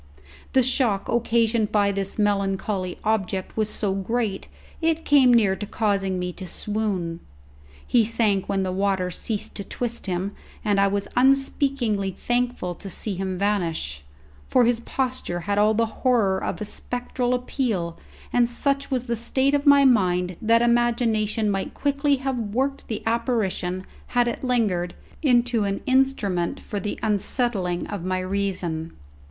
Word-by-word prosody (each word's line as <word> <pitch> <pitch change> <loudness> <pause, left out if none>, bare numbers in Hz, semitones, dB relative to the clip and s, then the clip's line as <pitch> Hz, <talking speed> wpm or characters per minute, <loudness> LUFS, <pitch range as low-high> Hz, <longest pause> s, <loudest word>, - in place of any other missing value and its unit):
The 260 - +5
shock 240 -6 +1
occasioned 230 -2 +2
by 205 -1 +3
this 195 0 -1
melancholy 195 -2 0
object 195 -3 -1
was 215 -1 0
so 205 -3 -1
great, 200 +1 -2 0.3
it 325 0 +1
came 275 -4 +6
near 210 -5 +4
to 210 - -6
causing 200 -4 0
me 180 0 -3
to 185 0 -7
swoon. 195 -6 -2 0.7
He 240 -2 +4
sank 215 -3 +1
when 195 -1 +1
the 185 - -1
water 190 -1 0
ceased 210 +4 -3
to 200 - -4
twist 235 +2 -4
him, 185 +2 -1 0.3
and 205 -2 +2
I 200 - +5
was 200 0 -1
unspeakingly 270 -5 +2
thankful 240 -2 -1
to 195 +3 -9
see 200 +3 -3
him 190 0 -3
vanish, 170 - -1 0.5
for 250 -2 +4
his 235 0 +2
posture 250 -8 -2
had 200 +3 0
all 215 +1 +4
the 230 +1 +3 0.2
horror 215 -7 +2
of - - -3
a 210 - -3
spectral 245 +3 -2
appeal, 225 - -2 0.4
and 240 -1 +3
such 275 +3 -1
was 255 -3 0
the 235 -1 -1
state 265 +4 +1
of 285 0 +1
my 280 -1 +7
mind 180 -7 +3
that 230 +1 +4
imagination 230 -3 +2
might 195 -1 -2
quickly 285 0 +1
have 265 -1 -2
worked 260 +6 -2
the 220 - -4
apparition, 220 -6 -1 0.2
had 245 -1 +2
it 235 - -3
lingered, 205 -9 0 0.3
into 245 -5 +3
an 200 0 -1
instrument 255 -10 +1
for 205 - -5
the 205 +2 -4
unsettling 205 -3 0
of 205 -4 -5
my 185 0 -1
reason. 185 -4 -2
215 Hz, 155 wpm, -24 LUFS, 190-245 Hz, 0.7 s, my